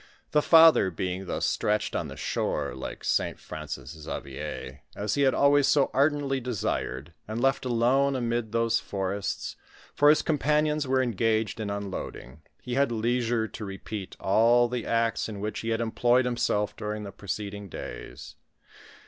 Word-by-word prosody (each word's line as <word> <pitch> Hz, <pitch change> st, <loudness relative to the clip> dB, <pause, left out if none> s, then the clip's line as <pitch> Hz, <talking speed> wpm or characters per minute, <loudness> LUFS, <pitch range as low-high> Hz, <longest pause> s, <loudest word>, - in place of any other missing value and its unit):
The 150 Hz, -, +4 dB
father 160 Hz, -, +7 dB
being 90 Hz, +2 st, -4 dB
thus -, -, -1 dB
stretched 105 Hz, 0 st, 0 dB
on -, -, -1 dB
the -, -, -9 dB
shore, -, -, -2 dB
like -, -, -7 dB
St. -, -, 0 dB
Francis -, -, -7 dB
Xavier, 70 Hz, -3 st, -7 dB
as 105 Hz, +1 st, -2 dB
he 140 Hz, -, +1 dB
had 135 Hz, -2 st, +4 dB
always 140 Hz, 0 st, +4 dB
so 145 Hz, -2 st, +3 dB
ardently 140 Hz, 0 st, +2 dB
desired, 85 Hz, -, -3 dB
and 110 Hz, +2 st, -3 dB
left 135 Hz, +1 st, +1 dB
alone 130 Hz, +3 st, +2 dB
amid 120 Hz, -3 st, -1 dB
those 115 Hz, 0 st, +2 dB
forests 100 Hz, 0 st, -3 dB, 0.2 s
— -, -, -24 dB
for 145 Hz, -, +6 dB
his 150 Hz, -, +5 dB
companions 150 Hz, -1 st, +1 dB
were 130 Hz, 0 st, +2 dB
engaged 115 Hz, -1 st, 0 dB
in 105 Hz, -2 st, -3 dB
unloading 95 Hz, -8 st, -6 dB
— -, -, -41 dB
he 125 Hz, -, -4 dB
had 140 Hz, -1 st, +2 dB
leisure 115 Hz, 0 st, 0 dB
to 110 Hz, -, -8 dB
repeat 100 Hz, 0 st, -6 dB
all 115 Hz, +4 st, +4 dB
the 120 Hz, -1 st, -4 dB
acts 115 Hz, -1 st, 0 dB
in 105 Hz, -2 st, -6 dB
which 105 Hz, +1 st, -3 dB
he 115 Hz, -, -4 dB
had 115 Hz, 0 st, 0 dB
employed 120 Hz, +2 st, +2 dB
himself 120 Hz, -4 st, 0 dB
during 105 Hz, 0 st, -4 dB
the 100 Hz, -, -7 dB
preceding 100 Hz, 0 st, -5 dB
days. 70 Hz, -4 st, -8 dB
115 Hz, 165 wpm, -27 LUFS, 100-130 Hz, 0.2 s, father